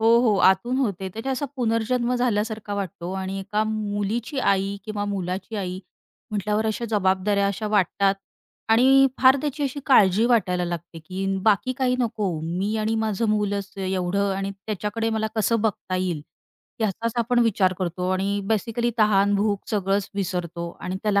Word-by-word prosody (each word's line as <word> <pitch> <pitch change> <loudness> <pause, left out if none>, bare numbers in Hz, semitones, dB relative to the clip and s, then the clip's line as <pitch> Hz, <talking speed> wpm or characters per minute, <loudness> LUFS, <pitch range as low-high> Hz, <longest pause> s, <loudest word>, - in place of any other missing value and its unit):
हो, 225 - +2
हो, 220 -5 +3
आतून 190 +8 +3
होते. 195 -7 -1
त्याच्या 225 +8 -4
असा 265 +2 -2
पुनर्जन्म 240 +1 0
झाल्यासारखा 220 -3 -1
वाटतो 185 -2 -4
आणि 190 0 -3
एका 210 +2 -1
मुलीची 215 +4 -2
आई 195 -3 +1
किंवा 215 -2 -3
मुलाची 195 +1 -3
आई 185 -2 -3 0.5
म्हटल्यावर 210 +1 0
अशा 220 +2 -2
जबाबदाऱ्या 200 0 +2
अशा 200 +2 -2
वाटतात 200 -1 +2 0.5
आणि 265 +4 +6
फार 260 +1 +6
त्याची 295 0 -3
अशी 280 +1 -2
काळजी 210 -5 +5
वाटायला 185 -7 +2
लागते, 170 -1 -5
की 185 +4 -5 0.2
बाकी 215 +3 +3
काही 255 -1 +2
नको 220 -5 -1
मी 180 +6 -2
आणि 215 +1 0
माझं 220 0 0
मूलच 205 -2 -1
एवढं 190 +1 0
आणि 195 0 -2
त्याच्याकडे 210 +3 -3
मला 220 -1 0
कसं 225 +1 +1
बघता 205 -3 -1
येईल 180 -4 -1 0.6
याचाच 220 +2 -1
आपण 240 +1 +2
विचार 195 -4 +2
करतो. 180 0 -2
आणि 195 +2 0
बेसिकली 230 +2 0
तहान 205 -1 +4
भूक 205 0 +1
सगळंच 195 -1 0
विसरतो 175 -3 -3
आणि 185 +1 -3
त्याला 205 -2 +2
205 Hz, 155 wpm, -24 LUFS, 190-225 Hz, 0.6 s, आणि